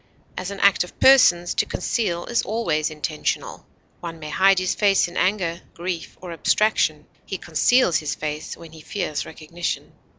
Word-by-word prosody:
As 185 +1 -4
an 200 0 -7
act 200 -2 +5
of 180 - -14
persons, 175 -10 +6
to - - 0
conceal 180 -3 -2
is 235 - +1
always 170 -8 -1
intentional; 155 0 -4 0.3
one 165 -1 -7
may 155 -1 -8
hide 195 +2 +4
his 185 0 +1
face 200 -3 +3
in 175 - -12
anger, 185 -3 0
grief, 175 -1 -5
or 180 -2 -7
abstraction; 165 -4 +1 0.2
he 190 - -5
conceals 175 - +3
his 150 0 -3
face 150 0 -5
when 165 -1 -12
he 160 -1 -13
fears 155 -3 -3
recognition. 170 +2 -5
175 Hz, 165 wpm, -23 LUFS, 160-195 Hz, 0.3 s, persons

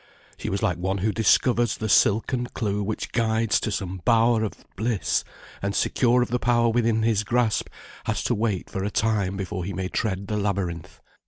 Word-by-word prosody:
She - - -5
was 100 +2 -2
like 90 -5 0
one 95 +2 -1
who 105 +3 0
discovers 120 +1 +2
the 110 - -3
silken 115 +4 +3
clue 105 -4 -2
which 105 +2 -3
guides 110 -2 +1
to - - -2
some 95 -2 -4
bower 115 0 +3
of 110 - -6
bliss, 110 0 0 0.4
and 100 0 -2
secure 125 0 +3
of - - -5
the 125 +1 0
power 120 -1 +3
within 115 -1 +1
his 110 -2 +2
grasp, 120 0 +1 0.4
has - - -1
to - - +1
wait 105 -4 -1
for 95 - -4
a 100 - -1
time 105 -3 0
before 95 -1 -4
he 100 +3 -4
may 95 +1 -3
tread 100 -2 -2
the 105 +1 -2
labyrinth. 95 -5 -3
110 Hz, 190 wpm, -25 LUFS, 100-115 Hz, 0.4 s, silken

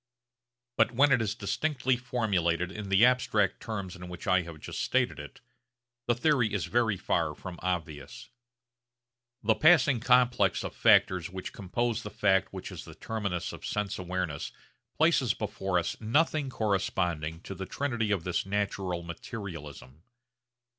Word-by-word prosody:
But 115 +1 +3
when 140 +4 +4
it 120 - +4
is 105 -1 -1
distinctly 130 0 0
formulated 95 -8 0
in 105 0 -6
the 100 +4 +6
abstract 125 -5 +2
terms 100 -5 -5
in 90 -1 -9
which 90 0 -8
I 95 -2 +4
have 85 -2 -9
just - - -5
stated 125 - +1
it, 75 - -10 0.7
the 120 - +3
theory 125 -4 +2
is - - -1
very 115 -4 +1
far 80 -3 0
from 90 +1 -8
obvious. 80 -6 -4 1.1
The 110 +1 +4
passing 150 -2 +5
complex 125 -5 +3
of - - -6
factors 90 -2 +4
which 95 0 -7
compose 115 +4 -2
the 105 - -6
fact 95 -3 +2
which - - -7
is - - -7
the - - -12
terminus 100 -6 -3
of - - -10
sense 105 -2 -2
awareness 90 -5 -3 0.5
places - - +3
before 95 -2 -2
us 85 - -1
nothing 145 +5 +1
corresponding 90 -8 -1
to 100 - -7
the 95 0 -6
trinity 120 -6 -1
of 95 -5 0
this 90 -1 -1
natural 95 -3 -2
materialism. 85 - -8
100 Hz, 150 wpm, -29 LUFS, 90-120 Hz, 1.1 s, the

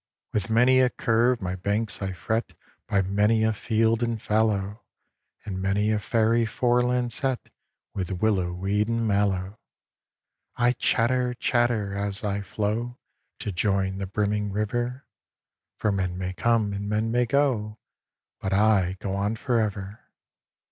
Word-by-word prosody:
With 105 -1 -1
many 125 +3 +5
a 130 -1 +4
curve 115 0 +1
my 90 0 -2
banks 100 +2 -2
I 95 -1 -2
fret 110 +5 -2 0.3
By 100 -1 +2
many 105 +4 +2
a 110 0 +2
field 110 +1 +1
and 115 -1 -1
fallow. 105 -1 0 0.6
And 95 -3 -4
many 100 +2 +1
a 105 - +1
fairy 115 +2 +2
foreland 120 +1 +1
set 130 -1 -1 0.4
With 95 -3 -3
willow 95 -5 +1
weed 100 +4 0
and 115 -1 0
mallow. 100 0 0 1.0
I 120 0 +3
chatter, 125 0 +1
chatter, 120 -5 +1
as 100 +2 -2
I 100 -1 -1
flow 110 +4 -3 0.4
To 105 - -3
join 95 0 0
the 100 - -3
brimming 105 +1 -1
river, 120 +5 -2 0.7
For 105 - +1
men 95 -2 -2
may 90 0 -3
come 110 0 +1
and 100 +1 -4
men 110 +2 0
may 120 0 +2
go, 115 -6 +1 0.6
But 95 - -2
I 95 -3 +3
go 95 - -3
on 100 +3 -1
for 120 +1 0
ever. 100 -1 -3
105 Hz, 145 wpm, -26 LUFS, 100-115 Hz, 1.0 s, many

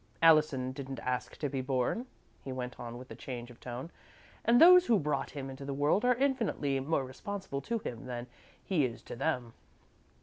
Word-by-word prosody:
Allison 155 -6 +5
didn't 135 -1 -6
ask 125 0 -3
to 145 - -1
be 135 -1 -2
born," 130 - -1 0.4
he 135 - -5
went 125 -1 -5
on, 120 0 -6
with 130 0 -11
a - - -6
change 120 0 -7
of 120 - -16
tone, 125 +6 -6 0.5
"and 235 +2 +5
those 360 +1 +9
who 230 - +5
brought 150 -4 -1
him 140 -2 -6
into 135 +1 -8
the 140 0 -4
world 145 - +2
are 250 0 +4
infinitely 230 - 0
more 135 0 0
responsible 140 +2 -5
to 230 +8 -1
him 125 - -6
than 120 -1 -4 0.4
he 175 -7 +2
is 120 -3 -3
to - - -7
them." 125 -3 -1
135 Hz, 195 wpm, -32 LUFS, 125-165 Hz, 0.5 s, those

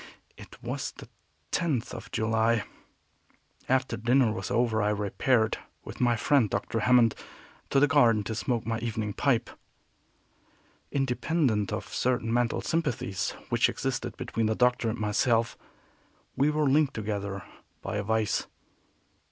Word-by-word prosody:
It - - -13
was - - -4
the - - -12 0.4
tenth 150 -9 -1
of - - -8
July. 110 0 +1 1.1
After 130 -2 +1
dinner 120 +1 +3
was - - -5
over 120 -2 +1
I 105 - +2
repaired, 110 +3 +1 0.2
with - - -8
my 120 -1 +3
friend 115 0 +3
Dr. 115 - -2
Hammond, 120 -1 +4 0.6
to 135 - +3
the 145 - +6
garden 115 -8 +4
to 110 - -4
smoke 115 +1 -1
my 115 0 -1
evening 110 -2 -3
pipe. 120 -2 +1 1.4
Independent 135 - 0
of - - -4
certain 120 -2 0
mental 120 -1 +1
sympathies 125 - -2
which - - +3
existed - - -3
between 115 -1 -1
the 110 - 0
Doctor 125 -1 +2
and 115 - -3
myself, 115 +2 +1 0.8
we 140 +3 +3
were 150 -1 +1
linked 145 +1 +3
together 100 -2 -3 0.4
by - - -3
a 105 - -1
vice. 110 0 0
115 Hz, 135 wpm, -28 LUFS, 110-130 Hz, 1.4 s, the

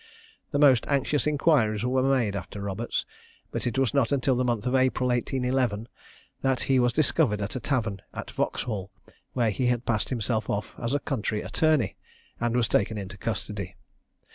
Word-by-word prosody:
The 145 - -1
most 135 -5 +5
anxious 140 +1 +1
inquiries 140 -8 +2
were 130 +1 +2
made 130 -6 +2
after 100 +1 -6
Roberts, 100 +3 -2 0.5
but - - -2
it 120 - -2
was 135 -1 +2
not 140 -3 +2
until 135 -1 +2
the 125 - +1
month 120 -2 0
of 125 - 0
April 130 -1 +2
1811 125 -3 0 0.5
that 130 -2 +1
he 135 -1 +3
was 120 0 +3
discovered 135 -5 +2
at 100 +3 -4
a - - -1
tavern 115 -8 -1
at - - -7
Vauxhall, 100 -5 -2 0.4
where 120 -4 +2
he 125 +5 0
had 120 0 0
passed 110 -3 0
himself 110 -3 -1
off 100 0 -2
as 115 +4 -1
a - - +2
country 110 -7 -2
attorney, 115 - +1 0.4
and 120 0 0
was 120 -3 +2
taken 105 +2 +1
into 100 -1 -6
custody. 105 -2 -4
120 Hz, 175 wpm, -27 LUFS, 105-130 Hz, 0.5 s, most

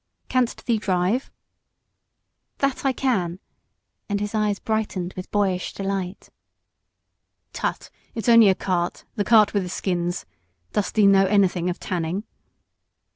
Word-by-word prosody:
"Canst 255 -2 0
thee 230 -3 +1
drive?" 190 +6 0 1.3
"That 275 -1 0
I 270 - +4
can!" 200 -10 0 0.7
and 205 0 0
his 205 +1 -3
eyes 210 -2 +1
brightened 205 -5 -2
with 185 - -7
boyish 195 -3 0
delight. 195 -1 -4 1.2
"Tut! - - -3 0.2
it's 225 - -4
only 230 -3 +8
a 190 - +3
cart 175 -2 -2
the 205 - 0
cart 215 0 +5
with 200 - +2
the 180 - -5
skins. 175 -1 -2 0.5
Dost 205 - -1
thee 215 -2 +5
know 195 -1 +6
anything 185 -3 +2
of 180 - -4
tanning?" 175 +2 -2
200 Hz, 130 wpm, -23 LUFS, 180-215 Hz, 1.3 s, only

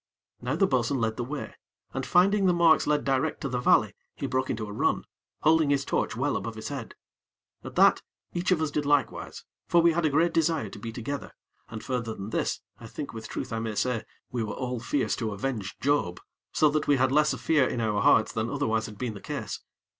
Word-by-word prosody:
Now 125 +4 -1
the 195 - +4
bo'sun 130 -3 +1
led 110 -1 -1
the 120 - -1
way, 140 +4 -5 0.4
and, - - -3
finding 195 +2 +4
the 180 - +4
marks 170 -2 +5
led 150 0 +2
direct 135 +3 0
to 140 - -2
the 125 -1 -1
valley, 110 -4 +4 0.2
he - - -4
broke 130 0 -1
into 110 -2 -2
a 105 - -7
run, - - 0 0.4
holding 160 -1 +4
his 140 -1 +2
torch - - -1
well 135 +4 0
above 115 -1 -4
his 110 - -6
head. 135 -5 -6 0.7
At - - -8
that, - - +5 0.3
each 175 +1 -1
of 170 -4 +3
us 155 - -1
did 150 - 0
likewise; 145 -1 0 0.2
for 170 - +4
we 170 0 +5
had 170 +1 0
a 155 - +3
great 165 +4 +2
desire 160 -8 +1
to 105 - -10
be 115 +2 -5
together, 130 +5 -5 0.4
and 110 -1 -7
further 115 -4 -2
than 100 +3 -7
this, - - -1 0.2
I 115 - -9
think 145 +5 -6
with 110 -1 -7
truth - - -4
I 115 - -1
may 110 -1 -3
say, 120 0 0 0.3
we 120 - -2
were 105 -2 -4
all 125 -1 -3
fierce 130 +4 0
to 110 -3 -2
avenge 105 -2 -4
Job, 140 -11 +1 0.3
so 155 - +4
that 155 +1 -1
we 145 - +5
had 130 0 +2
less 150 +2 +4
of - - -7
fear 150 -5 +3
in 120 - -2
our 105 -2 0
hearts 110 +1 +4
than 110 +1 -1
otherwise 115 -6 0
had 105 - -10
been 120 0 -3
the 100 - -10
case. - - -5
130 Hz, 230 wpm, -27 LUFS, 115-150 Hz, 0.7 s, marks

